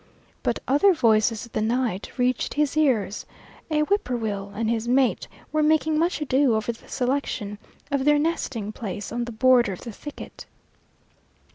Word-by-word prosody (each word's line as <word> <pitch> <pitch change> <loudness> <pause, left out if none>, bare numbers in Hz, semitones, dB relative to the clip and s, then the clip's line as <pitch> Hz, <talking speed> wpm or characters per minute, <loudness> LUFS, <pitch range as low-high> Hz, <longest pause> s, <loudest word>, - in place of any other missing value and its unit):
But - - 0
other 350 +8 +4
voices 225 -3 +2
of 235 - -17
the - - -1
night 230 -2 -1
reached 250 0 0
his 295 0 +1
ears; 235 -10 +1 0.4
a 305 -1 +2
whippoorwill 230 - -1
and 225 +1 -1
his 230 0 -1
mate 255 +1 +2 0.2
were 310 - +1
making 310 0 +2
much 340 +1 +1
ado 270 -4 +2
over 220 +2 -1
the 230 - -15
selection 245 -6 -2 0.3
of 280 -1 +1
their 295 +1 +4
nesting 270 -9 -2
place 210 -2 -6
on 240 +1 -2
the 240 - -6
border 240 -2 +4
of 180 - -9
the 235 - -7
thicket. 295 +7 -10
245 Hz, 160 wpm, -24 LUFS, 220-295 Hz, 0.4 s, other